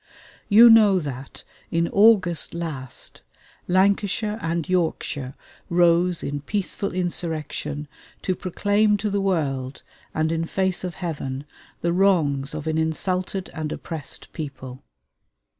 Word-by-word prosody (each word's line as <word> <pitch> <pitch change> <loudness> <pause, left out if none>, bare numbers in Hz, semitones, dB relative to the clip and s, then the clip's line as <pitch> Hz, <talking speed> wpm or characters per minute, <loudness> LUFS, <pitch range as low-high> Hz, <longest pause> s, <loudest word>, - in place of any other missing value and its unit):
You 225 +3 +9
know 215 -4 +7
that 135 -5 -6 0.3
in 170 0 +1
August 195 -7 +4
last, 150 -7 -6 0.5
Lancashire 200 +3 +1
and 165 -2 -2
Yorkshire 160 -6 -1 0.3
rose 175 0 +3
in 145 0 -3
peaceful 200 +4 -3
insurrection 165 -4 -2 0.4
to 185 - 0
proclaim 205 +4 +1
to 210 0 -2
the 200 0 0
world, 140 -8 -1 0.3
and 155 +1 0
in 165 0 -1
face 190 +1 -1
of 180 -1 -4
Heaven, 145 -6 -4 0.4
the 170 0 +1
wrongs 155 -7 +2
of 155 -1 -5
an 160 0 0
insulted 180 +4 -2
and 155 -2 -4
oppressed 155 -5 -5
people. 130 -4 -7
170 Hz, 120 wpm, -23 LUFS, 150-190 Hz, 0.5 s, You